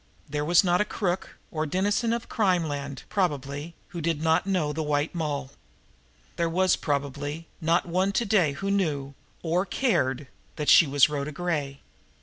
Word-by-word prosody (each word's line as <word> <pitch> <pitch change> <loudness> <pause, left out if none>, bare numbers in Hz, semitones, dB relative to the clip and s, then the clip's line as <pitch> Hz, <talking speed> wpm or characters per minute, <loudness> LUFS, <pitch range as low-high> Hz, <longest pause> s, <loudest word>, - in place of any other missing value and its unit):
There 150 0 -2
was 170 +4 +5
not 180 0 +3
a - - +5
crook 195 -3 -3
or 155 -1 -2
denizen 200 +7 +1
of 235 0 -2
crimeland, 155 - -1
probably, 145 -3 -2
who 170 - -6
did 165 -1 0
not 160 +3 +2
know 175 -7 0
the 160 - -2
White 150 0 0
Moll; 145 -5 -3 0.9
there 170 -1 +1
was, 185 +2 +3
probably, 145 +2 -3
not 165 +2 +2
one 185 +3 +1
to 235 - +1
day 185 -9 +3
who 195 +8 -3
knew, 145 -8 -1 0.3
or 175 +2 +1
cared, 145 - 0 0.3
that 150 -2 -1
she 165 - +8
was 140 -1 +5
Rhoda 150 0 -3
Gray! 145 -4 -3
160 Hz, 160 wpm, -26 LUFS, 145-185 Hz, 0.9 s, she